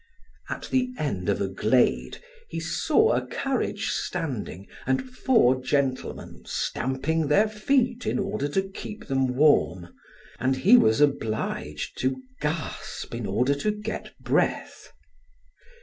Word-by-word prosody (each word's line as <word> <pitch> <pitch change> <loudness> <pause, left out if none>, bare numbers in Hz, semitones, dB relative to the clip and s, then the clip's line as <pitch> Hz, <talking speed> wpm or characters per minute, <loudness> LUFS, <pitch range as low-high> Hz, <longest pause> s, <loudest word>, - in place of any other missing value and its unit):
At - - -5
the 255 -1 +2
end 100 -11 -2
of 100 - +1
a 100 - 0
glade 110 +6 +1 0.3
he - - -4
saw - - +2
a - - 0
carriage 270 -1 -1
standing 110 - -3 0.2
and 130 - +1
four 230 - +3
gentlemen 135 -1 -2
stamping 140 +5 -1
their 200 +9 +4
feet 245 +2 0
in - - +1
order 195 -8 -1
to 190 +7 0
keep 195 +2 -8
them 135 -2 0
warm, 95 - +3 0.5
and 130 +1 +1
he 190 - +6
was 110 - +5
obliged 110 - -1
to 130 0 0 0.2
gasp 150 -3 -4
in 115 -3 -3
order 125 +8 +2
to 140 +9 -1
get 210 +1 -5
breath. - - -1
140 Hz, 130 wpm, -26 LUFS, 125-210 Hz, 0.5 s, he